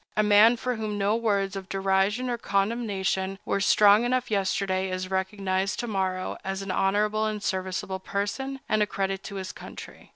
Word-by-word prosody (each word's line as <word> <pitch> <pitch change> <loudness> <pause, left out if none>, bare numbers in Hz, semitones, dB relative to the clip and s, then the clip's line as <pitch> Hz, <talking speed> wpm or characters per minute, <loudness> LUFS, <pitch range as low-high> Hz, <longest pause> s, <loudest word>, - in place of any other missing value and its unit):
A 215 - +4
man 210 +3 +6
for 250 +1 -2
whom 215 -1 -3
no 205 +2 +2
words 200 -4 0
of 195 -1 -7
derision 195 +5 +1
or 240 -1 -2
condemnation 195 -2 -1
were - - 0
strong 205 +2 +5
enough 250 -1 0
yesterday 190 -1 0
is 185 0 -4
recognized 190 0 -1
to 240 - -4
morrow 190 -3 -2
as 195 0 -3
an 195 - -4
honorable 210 +3 +1
and 210 -1 -4
serviceable 190 +1 -2
person, 235 +9 -3
and 215 - +1
a 210 - +3
credit 195 -1 -2
to 200 - -7
his 190 0 -4
country. - - -11
200 Hz, 175 wpm, -26 LUFS, 190-215 Hz, -, man